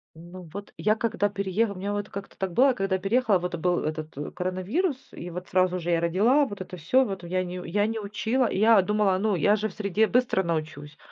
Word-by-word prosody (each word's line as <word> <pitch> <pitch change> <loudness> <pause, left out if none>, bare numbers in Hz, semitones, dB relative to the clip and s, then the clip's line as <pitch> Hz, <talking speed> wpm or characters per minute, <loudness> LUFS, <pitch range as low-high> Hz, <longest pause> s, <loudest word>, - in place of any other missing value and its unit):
Ну, 175 +2 -11
вот 200 0 -8
я 215 +1 +2
когда 220 -2 0
перееха 200 +2 -1
у - - -7
меня 195 +2 -3
вот 205 0 -3
как-то 200 0 -8
так 190 -2 -3
было, 265 +4 +5
когда 195 -3 -1
переехала, 210 0 +2
вот 180 0 -3
был 175 +1 +1
этот 155 0 -4 0.2
коронавирус, 185 - -1 0.2
и 175 - -8
вот 180 +1 -7
сразу 185 0 +2
же 175 0 -4
я 170 -1 +3
родила, 220 - +3
вот 205 -6 -7
это 180 0 -7
всё, 255 +12 +3
вот 195 -6 -5
я 185 +2 -1
не 180 0 -6
я 205 +4 +1
не 225 0 -3
учила. 220 +5 0
Я 220 +2 +5
думала: 210 -1 +2
"Ну, 210 +2 +1
я 205 +6 +3
же 215 +1 -2
в - - -14
среде 210 +1 +1
быстро 245 -5 +1
научусь". 155 -3 -4
195 Hz, 220 wpm, -26 LUFS, 180-215 Hz, 0.2 s, было